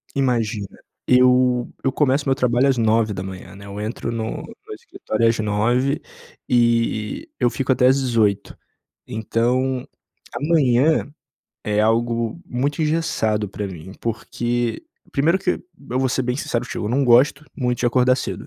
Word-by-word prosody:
Imagina. 115 -6 0 0.4
Eu 125 -1 +4
eu 135 - +1
começo 140 0 +1
o - - -1
meu 135 - +4
trabalho 125 0 +2
às 135 - +2
9h, 105 -5 -1
né. 100 - -12
Eu 100 +1 -7
entro 110 +2 -4
no 110 -1 -4
no - - -11
escritório 110 +2 -2
às 115 - +1
9h 120 +7 +1 0.5
e 115 - +1
e - - -46
eu 120 - +3
fico 130 +1 0
até 125 0 +3
às 130 +2 +5
18h. 110 -6 0 0.5
Então, 125 +3 -1 0.5
a - - -4
manhã 145 -1 +3 0.5
é 105 0 0
algo 115 +4 +1
muito 140 +5 -2
engessado 150 -10 0
pra 100 +1 -4
mim 95 0 -9
porque 120 - -2 0.3
Primeiro 165 +7 +2
que, 185 - -1 0.4
eu 125 - 0
vou 130 - +2
ser 130 - 0
bem 125 0 -2
sincero 120 -4 -2
contigo, 125 - -5
eu - - -2
não 135 +4 +2
gosto 130 +4 +4
muito 125 -2 -1
de - - 0
acordar 125 +1 +3
cedo. - - -5
120 Hz, 160 wpm, -21 LUFS, 110-130 Hz, 0.5 s, às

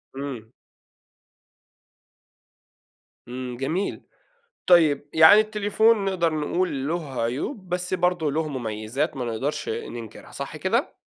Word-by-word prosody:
إمم. 130 -5 -6 2.8
إمم، 125 0 -6
جميل 160 +10 -2 0.7
طيب، 155 -5 +4
يعني 160 +6 +8
التليفون 215 0 +2
نقدر 175 -4 +1
نقول 150 -2 -1
له 155 -6 -3
عيوب 160 - -3
بس 180 +1 -2
برضه 180 -4 +1
له 155 +2 -1
مميزات 120 +2 -3
ما 125 - -3
نقدرش 120 +6 -3
ننكرها 115 0 -7
صح - - -6
كده؟ - - -1
155 Hz, 105 wpm, -24 LUFS, 130-180 Hz, 2.8 s, يعني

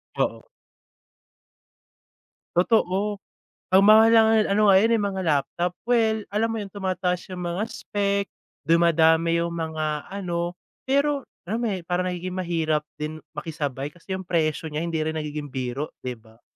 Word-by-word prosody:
Oo. - - -1 2.1
Totoo, 200 +1 +2 0.5
ang 190 - +8
mahal 220 +1 +8
na 225 - +8
nga 220 - +4 0.2
ano, 210 0 +4
ngayon, 195 +4 +5
eh, 220 - +2
mga 195 -2 -2
laptop. 170 +4 0
Well, 220 -3 +2
alam 215 +3 0
mo - - -2
yun, 200 - -7
tumataas 185 -2 -2
yung 180 - -5
mga 175 +4 -1
spec, 200 -1 -1 0.4
dumadami 165 0 +4
yung 170 0 -2
mga 155 -2 -3
ano 175 -3 -3 0.3
Pero 280 0 +1 0.2
RAM, 225 +5 -2
eh, 195 -5 -2
parang 180 +1 0
nagiging 180 +1 -4
mahirap 165 -4 0 0.2
din 155 +1 -5
makisabay 145 -3 -4
kasi 175 +2 -8
yung 190 0 -5
presyo 160 -2 0
niya 150 +2 -3
hindi 165 -2 -2
rin 160 +1 -2
nagiging 150 -1 -4
biro, 130 +2 -3
'di 125 -1 -4
ba? 110 +1 -22
175 Hz, 150 wpm, -24 LUFS, 155-200 Hz, 2.1 s, ang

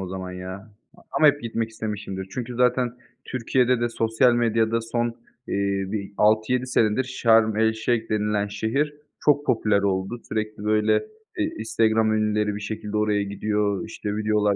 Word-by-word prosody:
o 95 - -4
zaman 95 0 -5
ya 90 0 -6 0.5
a - - -18
ama 155 - +3
hep 145 -2 +4
gitmek 115 -1 -2
istemişimdir. 105 -3 -5
Çünkü 125 0 -5
zaten 125 0 +2 0.3
Türkiye'de 125 0 +1
de 120 - +1
sosyal 115 +1 +2
medyada 115 -1 +2
son, 120 +1 -1 0.4
eee, 100 -1 0
bir 100 -2 -4
6-7 110 +4 +2
senedir 115 0 +2
Şarm 115 -4 +3
El-Şeyh 110 +1 +1
denilen 105 -1 0
şehir 115 +9 -1 0.3
çok 145 0 +3
popüler 105 -3 +2
oldu, 100 +4 -1
sürekli, 110 -1 -3
böyle, 105 0 +2 0.5
eee, 315 - +2
Instagram 110 -7 +2
ünlüleri 105 -1 +1
bir 105 - -5
şekilde 105 0 -4
oraya 105 -1 +2
gidiyor, 100 0 -1
işte, 105 -1 -4
videolar 105 -1 +2
110 Hz, 150 wpm, -24 LUFS, 105-115 Hz, 0.5 s, hep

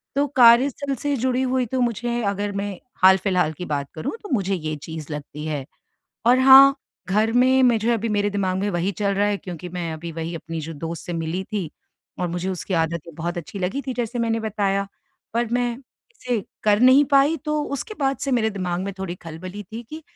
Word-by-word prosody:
तो 285 +1 +3
कार्यस्थल 255 +4 +5
से 285 +3 -1
जुड़ी 255 +1 0
हुई 255 -1 +1
तो 255 +3 -2
मुझे, 240 0 -1
अगर 200 0 -1
मैं 200 -1 -3 0.2
हाल-फिलहाल 185 -3 +4
की 180 +4 -7
बात 140 -2 -3
करूँ, 155 - -4
तो - - -8
मुझे 195 -3 +1
ये 155 -2 -3
चीज़ 160 -2 -7
लगती 150 +1 -7
है, 145 -4 -3 0.6
और 250 +2 +6
हाँ, 270 +1 +9 0.3
घर 215 +3 +2
में 260 +2 +4
मैं 240 -3 +4
जो 220 +2 -2
है, 235 - +4
अभी 230 +1 -2
मेरे 205 -1 +1
दिमाग 190 -2 -1
में 205 +1 -1
वही 175 +2 0
चल 200 +2 -1
रहा 205 +1 +2
है 205 - 0
क्योंकि 180 -2 -8
मैं 170 -2 -4
अभी 165 +2 -6
वही 165 +1 -5
अपनी 165 0 -5
जो 160 +2 -6
दोस्त 165 +2 -6
से 175 - -4
मिली 165 +3 -2
थी 185 -7 -2 0.5
और 180 - 0
मुझे 175 +2 -3
उसकी 185 0 -3
आदत 165 0 0
ये 165 - -10
बहुत 175 +2 -3
अच्छी 185 +4 -7
लगी 190 +10 -2
थी, 260 - -1
जैसे 240 0 -3
मैंने 230 -1 0
बताया। 200 -2 -1 0.5
पर 235 0 +1
मैं 245 -1 0 0.3
इसे 250 - -2 0.2
कर 210 0 +3
नहीं 260 +3 +7
पाई, 280 +4 +5
तो 300 +1 -2
उसके 355 - -5
बाद 270 0 +1
से 275 - -2
मेरे 220 -3 +2
दिमाग 180 -3 -3
में 200 - -3
थोड़ी 185 -2 -4
खलबली 185 +5 -7
थी 230 +2 -5
कि, 315 +1 -7
200 Hz, 215 wpm, -23 LUFS, 175-245 Hz, 0.6 s, हाँ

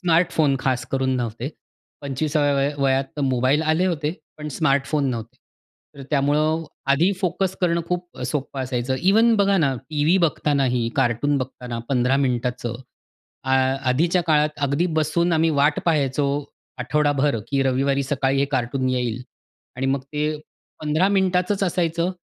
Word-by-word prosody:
Smartphone 160 -5 +2
खास 125 -2 -1
करून 130 -1 0
नव्हते. 120 +1 -3 0.5
25साव्या 145 +1 0
वय 140 +1 +1
वयात 135 0 +2
तर - - -3
मोबाईल 130 +3 +2
आले 160 +4 +2
होते, 155 -4 -1 0.3
पण 150 0 -5
स्मार्टफोन 140 -1 +1
नव्हते. 115 +1 -6 0.6
तर 140 - -9
त्यामुळं 150 +3 +1 0.3
आधी 170 +8 +3
फोकस 185 0 -1
करणं 170 -1 +2
खूप 180 0 -4
सोपं 140 -2 -4
अ, - - -1
असायचं. 125 0 -2
इव्हन 225 +5 +4
बघा 200 -1 +3
ना, 140 -4 +2 0.2
टीव्ही 155 +4 +2
बघतानाही, 140 -7 +1
कार्टून 135 +3 +1
बघताना 125 -2 -5
15 125 0 +2
मिनिटाचं 125 -3 -1 0.7
आ 130 0 +2 0.3
आधीच्या 170 +7 +2
काळात 150 -1 +2
अगदी 140 +6 +1
बसून 170 +3 +1
आम्ही 165 0 +3
वाट 145 +1 +3
पाहायचो 145 -4 +1 0.5
आठवडाभर 145 0 +1
की 140 -1 +1
रविवारी 135 +1 +1
सकाळी 135 0 0
हे 140 - +3
कार्टून 130 +1 0
येईल 125 -1 -1 0.5
आणि 135 +1 -1
मग 135 +1 +1
ते 150 +2 -4 0.6
15 155 +5 +1
मिनिटाचच 190 +1 +1
असायचं. 170 -1 0
140 Hz, 145 wpm, -22 LUFS, 130-160 Hz, 0.7 s, इव्हन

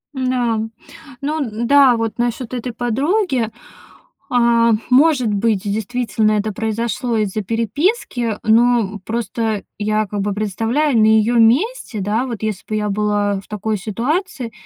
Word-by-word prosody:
Н-да, 250 -3 0 0.6
но 305 +3 -2
н-да, 250 +2 +3
вот 225 0 -3
насчёт 240 +1 -2
этой 245 0 -3
подруги. 260 - 0 0.8
А, 235 -1 +3 0.2
может 260 -2 +4
быть, 205 -1 +1
действительно 220 +1 -1
это 210 +1 0
произошло 225 +2 -2
из-за 210 0 -1
переписки, 230 - -1
но, 235 +2 +4
м, 205 - -7
просто 225 -1 -2 0.2
я 215 0 0
как 205 0 -3
бы 205 0 -1
представляю 225 +7 0
на 215 - +5
её 220 +2 +3
месте, 250 - +2
да, 215 +6 0
вот 230 -4 -5
если 215 -4 -3
бы 215 - -2
я 210 -1 -1
была 205 -1 0
в - - -22
такой 210 0 -2
ситуации, 245 - -3
230 Hz, 140 wpm, -19 LUFS, 215-250 Hz, 0.8 s, на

